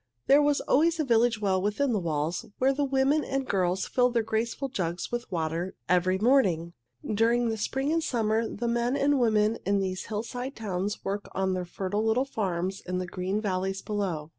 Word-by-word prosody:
There 285 +2 +6
was 290 -1 +2
always 330 +4 +2
a - - +2
village 235 -3 +3
well 190 -3 +1
within 210 +7 0
the 210 - +1
walls, 160 -1 -2
where 265 +1 +3
the 285 +1 0
women 275 +2 +2
and 270 +1 -2
girls 185 -1 0
filled 250 -1 +1
their 230 - +3
graceful 225 +5 -2
jugs 175 -7 -3
with 240 -2 -4
water 165 +1 -2
every 180 +2 +2
morning. 190 -8 +2 0.3
During 230 +2 +2
spring 270 +6 -1
and 330 0 +1
summer 225 -4 0
the 240 - -3
men 235 +3 +1
and 285 0 +2
women 220 -2 +2
in 200 +1 +1
these 185 -1 -3
hillside 245 +5 -4
towns 205 -1 -3
work 200 +1 -3
on 190 0 0
their 180 -1 -2
fertile 195 +4 -2
little 225 +4 +2
farms 190 -6 -2
in 180 0 -3
the 185 - -2
green 185 +3 -2
valleys 195 -1 -2
below. 185 -8 -3
215 Hz, 190 wpm, -28 LUFS, 185-250 Hz, 0.3 s, There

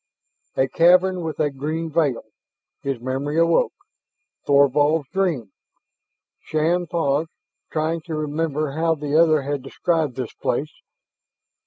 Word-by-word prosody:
A 130 - +3
cavern 180 +4 +4
with 160 -2 -5
a 150 -2 +1
green 155 +4 -4
veil 145 -6 +1 0.6
his 135 -3 -3
memory 135 +5 -3
awoke. 165 0 +3 0.7
Thorvald's 145 +2 +3
dream! 165 - -1 0.9
Shann 170 +3 0
paused, 160 -1 0 0.4
trying 160 +1 -1
to 165 -3 -4
remember 155 -1 -2
how 160 +2 +1
the 145 -1 -3
other 155 -3 +4
had 145 0 -2
described 150 0 -1
this 130 -3 -5
place. 140 +5 -2
155 Hz, 120 wpm, -22 LUFS, 140-165 Hz, 0.9 s, cavern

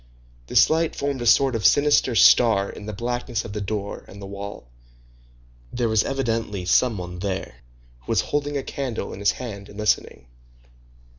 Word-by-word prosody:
This - - +5
light 160 0 +1
formed 140 -2 -2
a 120 - -1
sort 135 +2 +5
of 110 - -2
sinister 145 0 +4
star 110 -4 +5
in 105 - -10
the - - -3
blackness 120 +1 -3
of 100 - -7
the 105 - -4
door 100 0 -4
and 100 - -12
the 100 - -8
wall. 100 -7 -8 1.0
There 120 -1 -1
was 110 -1 +3
evidently 115 -8 -2
some 115 +5 +3
one 90 -1 -7
there, 95 -8 -4 0.4
who - - -28
was - - +3
holding 145 0 -2
a 135 - -3
candle 125 -7 -4
in - - -8
his 100 0 +2
hand 100 -6 -8
and 100 - -13
listening. 105 - -1
110 Hz, 175 wpm, -23 LUFS, 100-125 Hz, 1.0 s, This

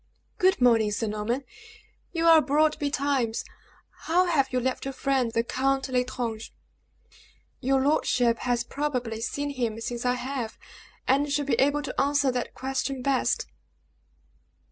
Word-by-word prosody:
"Good 375 -2 +3
morning, 230 -4 +4
Sir 210 +2 -1
Norman; 215 +5 -2 0.7
you 330 -1 -1
are 325 -1 +8
abroad 305 +1 +2
betimes. 275 -5 0 0.6
How 355 +3 +3
have 280 -7 +1
you 255 - +1
left 260 +1 -2
your 270 0 -5
friend, 265 -4 +1
the 230 0 +1
Count 270 +2 0
L'Estrange?" 250 -3 -2 1.1
"Your 265 +1 +2
lordship 245 -5 +2
has 245 -1 0
probably 250 -6 -3
seen 285 +4 -2
him 235 -5 -2
since 240 +1 -4
I 250 0 +2
have, 250 -3 -4 0.5
and 280 +2 +2
should 290 0 0
be 260 -4 +1
able 285 +2 +2
to - - -2
answer 280 -1 +2
that 250 -1 -4
question 265 0 -3
best." 270 - +1
260 Hz, 145 wpm, -26 LUFS, 240-285 Hz, 1.1 s, are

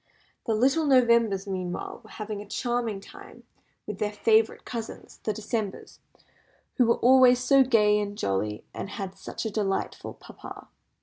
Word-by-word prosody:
The 225 - +2
little 275 +7 +2
Novembers, 235 -6 +4
meanwhile, 185 +2 -5
were 215 - -16
having 215 -1 -6
a 205 - -11
charming 235 -3 -2
time - - -14 0.4
with 210 -2 -6
their 210 -1 -1
favourite 220 +1 +2
cousins, 230 -2 -7
the 215 - -1
Decembers, 215 -1 -4 0.8
who 245 - +4
were 235 - +3
always 255 0 +6
so 260 +2 +4
gay 210 -5 +3
and 205 0 -4
jolly, 105 - -2
and - - -6
had 195 -2 -6
such - - -7
a 220 - -2
delightful 200 -2 -2
papa. - - -12
215 Hz, 150 wpm, -26 LUFS, 200-240 Hz, 0.8 s, always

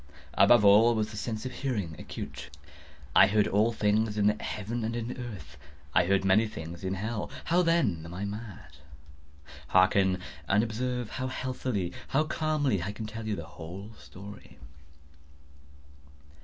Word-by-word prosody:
Above 120 -4 +6
all 110 +4 +7
was 110 -1 -1
the - - -9
sense 110 +2 -4
of 130 - -3
hearing 105 - -3
acute. - - -7 0.7
I 95 - +8
heard 105 +1 +3
all 105 +4 +3
things 105 0 +1
in 105 - +2
the 105 +1 +2
heaven 110 +3 -3
and 115 +1 -2
in 120 0 -3
the 125 - -6
earth. 100 - -8 0.4
I 90 - +4
heard 95 0 +2
many 105 +4 +4
things 85 -4 -8
in 95 +1 -1
hell. 105 +3 -3 0.2
How, 175 +2 +3
then, 165 - +2
am 85 - -9
I 95 +3 -4
mad? 105 - -8 0.9
Hearken! 95 0 +4 0.3
and 105 +3 +3
observe 120 +1 -3
how 130 0 -3
healthily—how 130 - -2
calmly 155 - 0
I 95 +4 -3
can 110 +1 -6
tell 110 +1 -6
you 105 - 0
the - - -6
whole 95 +6 -9
story. 100 +2 -12
105 Hz, 155 wpm, -29 LUFS, 95-120 Hz, 0.9 s, I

